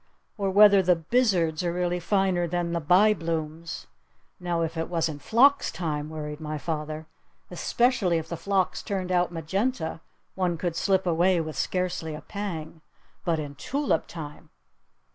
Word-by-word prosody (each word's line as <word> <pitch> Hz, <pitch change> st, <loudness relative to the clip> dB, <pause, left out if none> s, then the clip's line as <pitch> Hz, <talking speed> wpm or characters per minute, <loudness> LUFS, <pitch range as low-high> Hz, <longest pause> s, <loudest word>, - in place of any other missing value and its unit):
Or 200 Hz, -3 st, -1 dB
whether 200 Hz, 0 st, +7 dB
the 180 Hz, -1 st, +4 dB
'Bizards' 170 Hz, -3 st, +1 dB
are 175 Hz, -, 0 dB
really 180 Hz, 0 st, -1 dB
finer 185 Hz, -1 st, +1 dB
than 175 Hz, 0 st, -1 dB
the 170 Hz, -, -1 dB
'Byblooms'? 165 Hz, -3 st, +1 dB, 0.5 s
Now, 175 Hz, -2 st, -1 dB
if 165 Hz, +1 st, -3 dB
it 165 Hz, 0 st, -3 dB
was 165 Hz, -2 st, +1 dB
in 150 Hz, -2 st, -6 dB
phlox 265 Hz, -, +4 dB
time," 155 Hz, -3 st, -3 dB
worried 150 Hz, -1 st, -6 dB
my 155 Hz, -1 st, -4 dB
father. 155 Hz, 0 st, -4 dB, 0.5 s
"Especially 235 Hz, -8 st, +1 dB
if 160 Hz, 0 st, -4 dB
the 170 Hz, -, -4 dB
phlox 195 Hz, +1 st, 0 dB
turned 185 Hz, -2 st, -3 dB
out 175 Hz, -1 st, +2 dB
magenta, 175 Hz, -, -2 dB, 0.3 s
one 180 Hz, -3 st, 0 dB
could 170 Hz, 0 st, -2 dB
slip 190 Hz, +2 st, +1 dB
away 175 Hz, +1 st, +3 dB
with 155 Hz, -1 st, -4 dB
scarcely 180 Hz, -4 st, -2 dB
a 150 Hz, -, -8 dB
pang. 165 Hz, -5 st, -6 dB, 0.4 s
But 170 Hz, -2 st, +1 dB
in 145 Hz, -2 st, -5 dB
tulip 275 Hz, -, -1 dB
time 150 Hz, -3 st, -9 dB
170 Hz, 155 wpm, -26 LUFS, 160-190 Hz, 0.5 s, whether